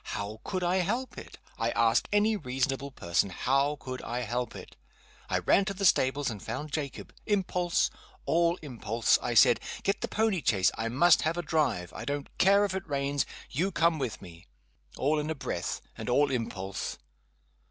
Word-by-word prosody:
How 105 +2 -5
could 185 -2 -3
I 175 +2 +2
help 235 +8 -1
it? - - -12 0.2
I 115 +1 +1
ask 115 0 +2
any 210 +1 +3
reasonable 135 -3 -2
person 90 -6 0
how 140 +9 +1
could 130 -1 -6
I 120 +1 -3
help 120 +1 -3
it? - - -10 0.5
I - - +2
ran 200 - +3
to 195 0 -3
the 195 +1 -1
stables 140 -4 +3
and 105 -5 -4
found 145 +7 -5
Jacob. 145 -3 -4
Impulse 180 -4 +1 0.3
all 170 +1 +3
impulse! 115 -4 +1
I 120 - -2
said, 120 0 +6 0.2
'Get 195 - 0
the - - -1
pony 215 -5 +1
chaise 95 -3 +3
I 115 0 -2
must 155 +8 +5
have 160 +2 0
a 175 - -2
drive 125 - 0
I - - -7
don't 145 0 -4
care 200 +2 +5
if 195 - -3
it 190 -3 -5
rains 140 0 0 0.2
you 180 +9 0
come 165 -2 +2
with 125 -7 -4
me.' 85 -1 -13 0.5
All 150 +3 +1
in 150 +1 -3
a 160 - -1
breath, 130 - -3
and - - -6
all 140 +3 +3
impulse! 100 -6 -3
140 Hz, 185 wpm, -29 LUFS, 115-175 Hz, 0.5 s, said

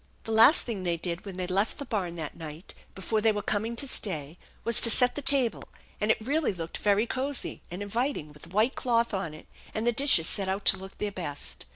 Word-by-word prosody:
The 225 - -5
last 225 +8 +7
thing 225 -6 -4
they 175 -2 0
did 170 +2 -4
when 195 -2 -7
they 185 - -2
left 195 +4 0
the 280 - -6
barn 190 -8 -2
that 155 -3 -5
night 160 +1 -9 0.2
before 215 +3 -1
they 220 +1 +4
were 205 -1 -3
coming 220 +4 -1
to 275 +4 +2
stay 160 - -3 0.2
was 235 -1 +3
to 230 - +5
set 245 +2 +4
the 290 - -4
table, 265 -5 +1 0.3
and 210 - -1
it - - +4
really 280 +5 0
looked 165 -2 -6
very 205 +2 +3
cozy 265 +3 -3
and 180 +4 -5
inviting 205 - -2
with 150 +2 -14
a - - -16
white 215 +8 +2
cloth 235 -2 +1
on 170 -6 -3
it 155 - -13 0.3
and 220 - -1
the 240 - +4
dishes 240 - +4
set 195 +2 +1
out 195 +1 -2
to 195 - +7
look 190 +1 -10
their 210 -1 -2
best. 155 -7 -5
205 Hz, 235 wpm, -28 LUFS, 180-235 Hz, 0.3 s, last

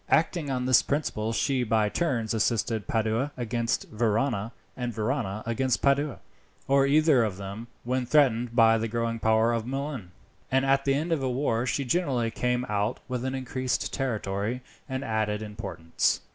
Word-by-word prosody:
Acting 160 -2 +2
on 125 -2 -1
this 130 -1 +6
principle 115 -7 -1
she 130 +2 +1
by 110 -2 +2
turns 120 -4 -1
assisted 110 -2 0
Padua 115 +5 0
against 115 -1 -1
Verona, 110 0 0 0.2
and 125 -1 -3
Verona 110 -2 -2
against 120 +2 0
Padua, 140 0 +2 0.5
or 140 0 +4
either 150 -3 +5
of 105 -4 -2
them 100 +4 -7 0.2
when 125 0 -1
threatened 125 -5 +3
by 115 -1 +6
the 115 - -1
growing 115 0 -2
power 110 +1 +3
of 115 0 -2
Milan, 135 -7 -4 0.4
and 135 +1 +3
at 135 0 +2
the 135 -1 +3
end 160 +4 -1
of 160 -4 +1
a 130 - 0
war 125 -2 0
she 140 - 0
generally 125 -6 0
came 125 +2 0
out 105 0 -1
with 125 -2 -3
an 130 0 -2
increased 130 -1 -2
territory, 110 -1 -2 0.3
and 130 +1 -3
added 110 -3 -1
importance. 100 -6 -1
120 Hz, 165 wpm, -27 LUFS, 110-135 Hz, 0.5 s, this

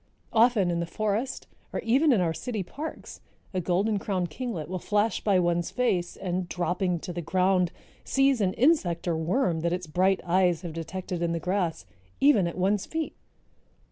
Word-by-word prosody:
Often 225 -5 +4
in 170 - -1
the 170 - -2
forest 215 +7 -2 0.3
or - - -2
even 270 +7 +3
in 220 -7 +4
our 165 -2 +1
city 220 +2 -3
parks 300 - -8 0.3
a 185 - 0
Golden 195 +5 +1
crowned 185 -4 -2
Kinglet 205 - -4
will 185 +2 -4
flash 210 +2 0
by 200 -3 +3
one's 175 -1 +1
face 195 -9 0
and, 180 -1 -3
dropping 180 0 -1
to 180 - -5
the 175 - -3
ground, 180 +1 +2 0.3
seize 270 -3 +2
an 190 -2 +1
insect 225 - +2
or 170 - +1
worm 170 +2 +1
that 170 +1 0
its 180 0 -3
bright 185 +4 +2
eyes 175 -1 +2
have 170 -3 -5
detected 175 +2 -5
in 170 -1 0
the 165 - -1
grass, 180 - -1 0.3
even 245 -11 +5
at 170 - -5
one's 190 +2 +1
feet. 320 -1 -3
185 Hz, 180 wpm, -27 LUFS, 175-215 Hz, 0.3 s, even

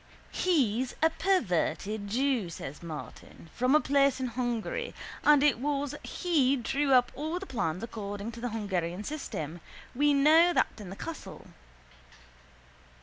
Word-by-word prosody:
—He's 260 - +1
a 320 - +5
perverted 210 - 0
jew, 245 -3 0
says 150 -3 -8
Martin, 160 0 -9
from 255 +4 +2
a - - +7
place 275 -1 +2
in 255 -1 -2
Hungary 245 - -3 0.3
and 295 -1 +6
it 295 -5 +3
was 285 0 -1
he 290 -7 +1
drew 275 +3 0
up 250 -2 +5
all 315 +5 -3
the 385 - -6
plans 185 - -2
according 205 -1 -5
to 235 - -10
the 245 - -2
Hungarian 190 -4 -2
system. 175 - -5 0.3
We 290 +3 +3
know 320 +5 +6
that - - +3
in 200 -4 -8
the 190 - -7
castle. 330 +9 -8
255 Hz, 145 wpm, -29 LUFS, 205-290 Hz, 0.3 s, a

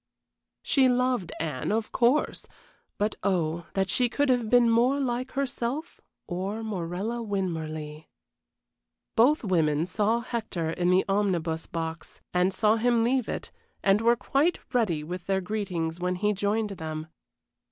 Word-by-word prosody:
She 265 -3 +4
loved 250 -7 +1
Anne, 150 -3 -2
of 220 0 -1
course, 250 +5 +1 0.5
but 210 0 -1
oh, 170 -3 0
that 190 -1 +1
she 245 +4 +2
could 285 +3 +1
have 245 -3 +2
been 245 0 +5
more 240 +5 +3
like 255 -1 -2
herself 275 +3 -3 0.2
or 195 +5 -3
Morella 200 +3 -3
Winmarleigh! 160 -7 -4 1.1
Both 255 +7 +4
women 160 -6 +2
saw 215 +5 +1
Hector 220 -9 -3
in 175 +1 0
the 185 +1 +4
omnibus 175 -5 0
box, 165 0 -5
and 180 +1 +3
saw 215 +3 +3
him 235 0 +3
leave 250 0 +1
it, - - -5 0.3
and 195 +2 +4
were 235 +1 +4
quite 285 +8 +1 0.2
ready 190 -11 +1
with 180 +3 -6
their 195 -1 +2
greetings 180 -5 -3
when 180 +1 0
he 210 +3 +1
joined 205 +2 0
them. 155 -4 -5
205 Hz, 140 wpm, -27 LUFS, 175-235 Hz, 1.1 s, been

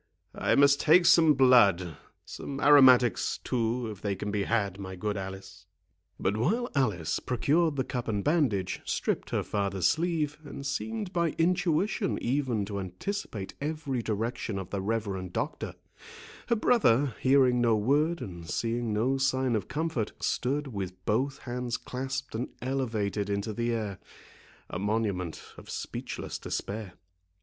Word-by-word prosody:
I - - +1
must 140 0 +5
take 170 +3 +6
some 160 -3 +6
blood—some 120 - +2
aromatics, 130 -5 +6
too, 120 0 -1
if 105 - -10
they 100 -2 -1
can 105 +2 -4
be 100 -1 -1
had, 100 -4 0
my 95 -1 -6
good 105 +3 -2
Alice." 95 -2 -8 0.5
But 100 +3 0
while 230 - 0
Alice 105 - 0
procured 150 +6 +1
the 130 - 0
cup 125 -2 -4
and 105 -3 -1
bandage, 115 - +1
stripped - - -2
her - - 0
father's 100 -3 -1
sleeve, 155 -2 +1
and 140 -2 -8
seemed 210 +6 -3
by 170 -3 0
intuition 180 +3 +1
even 125 -5 0
to 100 0 -4
anticipate 95 - -5
every 145 -4 -2
direction 115 0 -2
of 95 -3 -6
the 100 - -2
reverend 100 -4 -2
doctor, - - -3 0.7
her 235 - +3
brother, 145 - +3
hearing 130 -2 +4
no 115 -2 +4
word, 150 +10 +1
and 85 -3 -8
seeing 115 0 -1
no 125 +6 +1
sign 130 -2 +1
of 105 - -2
comfort, 155 -8 -2
stood 140 +4 -1
with 95 -7 -6
both 135 +6 0
hands 125 -1 -3
clasped 130 +1 -5
and 115 +3 -3
elevated 110 -6 -2
into 100 +2 -2
the 120 +2 -1
air, 105 -5 -3 0.7
a 90 - -5
monument 100 -5 -1
of - - -12
speechless - - -5
despair. 100 -2 -4
120 Hz, 145 wpm, -29 LUFS, 100-140 Hz, 0.7 s, take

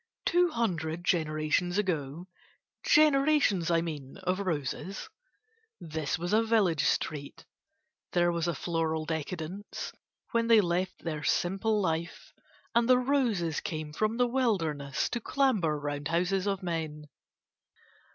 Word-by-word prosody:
Two 355 0 +4
hundred 175 - -2
generations 160 +2 +1
ago 170 -4 -2 0.6
(generations, 280 - +4
I 165 -1 +3
mean, 150 -4 -6
of 185 +1 0
roses) 180 +1 -3 0.7
this 160 -4 -3
was 175 +4 -3
a 220 - +5
village 210 -9 +2
street; 145 -2 -2 0.7
there 175 -1 +3
was 170 0 -1
a 170 - 0
floral 160 -1 -1
decadence 165 +5 -5 0.4
when 230 0 +1
they 230 -1 +7
left 180 -1 -1
their 155 -3 -3
simple 195 +7 +1
life 170 -2 -3 0.4
and 235 +1 +3
the 255 - +7
roses 245 - +1
came 155 -2 -5
from 215 +7 0
the 245 - +4
wilderness 180 - 0
to 240 - -2
clamber 215 - +1
round 145 0 -3
houses 180 +4 0
of 195 -1 -1
men. 160 -3 -4
175 Hz, 125 wpm, -29 LUFS, 160-215 Hz, 0.7 s, they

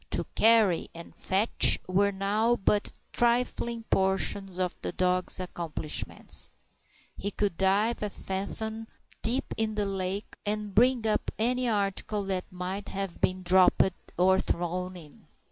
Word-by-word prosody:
To - - -2
"carry" 220 -6 +4
and 170 0 -11
"fetch" 200 +4 +3
were 200 +2 +2
now 210 +4 +1
but 205 -1 0 0.2
trifling 235 -1 +1
portions 190 0 +1
of 185 -1 -1
the - - -3
dog's 185 0 +1
accomplishments. 170 -4 -2 0.7
He 200 - -4
could 205 -3 -1
dive 200 +6 +2
a 210 - -1
fathom 220 +4 -4 0.3
deep 245 +4 0
in 220 -1 0
the 210 -1 0
lake 195 +1 -3
and 210 -1 -2
bring 245 +1 +4
up 215 - 0
any 250 +2 +2
article 205 0 -1
that 190 -2 -2
might 185 +2 -5
have 195 -3 -5
been 185 0 0
dropped 185 +1 +4 0.3
or 190 +2 +4
thrown 180 +1 -2
in. 150 -4 -14
195 Hz, 135 wpm, -28 LUFS, 185-220 Hz, 0.7 s, carry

